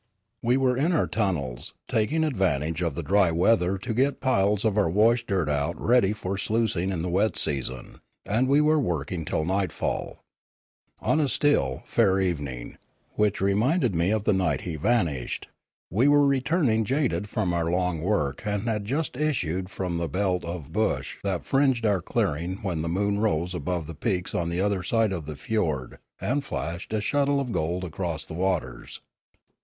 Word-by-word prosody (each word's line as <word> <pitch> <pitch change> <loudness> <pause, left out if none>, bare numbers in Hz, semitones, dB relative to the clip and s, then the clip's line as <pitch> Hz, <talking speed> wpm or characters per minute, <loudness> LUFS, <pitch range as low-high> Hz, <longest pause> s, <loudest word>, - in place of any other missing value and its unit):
We 120 +2 +2
were 130 -2 +2
in 155 +8 +1
our 165 - +2
tunnels, 75 - -2
taking 140 +9 +1
advantage 85 - 0
of 85 -5 -1
the 85 - -3
dry 95 +3 +3
weather 90 +2 +2
to 110 +5 -4
get 135 +4 +1
piles 105 -4 +2
of 110 -3 +2
our 105 -5 +2
wash 115 +6 +3
dirt 95 -6 0
out 75 +3 -1
ready 120 -5 +3
for 100 -2 -3
sluic 110 +1 0
ing 90 +2 -1
in 90 -4 -2
the - - -2
wet 100 +2 +1
season, 65 -3 -2 0.3
and 115 +6 +1
were 150 +3 +4
working 85 - -2
till 80 - -1
nightfall. 95 -1 -2 0.8
On 155 - +2
a 150 - +2
still, 115 - +1
fair 95 -5 +2
evening, 70 -10 -3 0.3
which 105 -2 0
reminded 115 - +2
me 85 +2 +1
of 110 -1 +1
the 105 - +3
night 95 -1 +1
he 85 -3 -4
vanished, 80 - 0 0.4
we 115 - +3
were 145 0 +5
returning 135 -4 +2
jaded 110 - 0
from 95 -6 -1
our 85 -1 0
long 90 -2 0
work 80 -7 0
and 105 -1 -1
had 110 -3 -1
just 140 +5 -2
issued 95 - -1
from 90 -4 -3
the 85 -1 -2
belt 90 +2 0
of 85 -4 -6
bush - - -1
that 95 -4 -2
fringed 135 -4 +2
our 100 -4 +2
clearing 85 +3 -1
when 90 -5 -1
the 85 - -2
moon 100 +3 0
rose 90 -5 0
above 90 -2 -2
the 80 - -7
peaks 90 +3 -2
on 85 -1 -1
the 85 +1 -2
other 100 -2 +1
side 110 +1 +1
of 80 -5 -5
the 75 - -5
fiord 75 - -2 0.2
and 140 +2 -1
flashed 85 - -5
a 110 -1 0
shuttle 140 +5 +1
of 130 -3 -3
gold 85 0 -1
across 85 -2 -4
the - - -9
waters. 85 -9 -2
95 Hz, 180 wpm, -26 LUFS, 85-115 Hz, 0.8 s, were